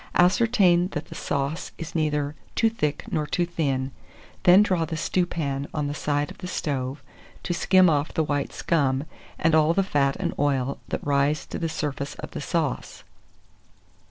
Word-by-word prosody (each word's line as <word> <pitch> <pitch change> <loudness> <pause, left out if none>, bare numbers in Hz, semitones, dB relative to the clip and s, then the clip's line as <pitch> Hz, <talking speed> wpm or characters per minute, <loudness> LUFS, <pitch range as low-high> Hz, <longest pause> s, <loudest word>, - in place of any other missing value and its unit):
Ascertain 185 -2 +4
that 150 - -4
the - - -8
sauce 140 +4 -2
is 165 -2 -7
neither 150 -2 0 0.2
too 225 -1 +3
thick 150 -10 -2
nor 150 -1 0
too 175 - 0
thin; 140 -6 -1 0.5
then 185 +3 +8
draw 185 -5 +1
the 160 0 -3
stewpan 155 -5 -1
on 150 -1 0
the 145 - -2
side 145 0 -1
of - - -13
the 180 - -6
stove, 135 -5 -3 0.4
to 175 - -1
skim 185 +1 +5
off 150 -1 +1
the 160 - +1
white 145 -2 -1
scum, 140 -5 +1 0.3
and 165 0 +2
all 160 +1 +4
the 195 - +3
fat 140 -6 +1
and - - -2
oil 140 -2 0
that - - -4
rise 145 +1 +1
to - - -6
the 165 - -1
surface 145 -2 -3
of - - -8
the - - -5
sauce. 155 -2 -2
150 Hz, 175 wpm, -25 LUFS, 140-175 Hz, 0.5 s, then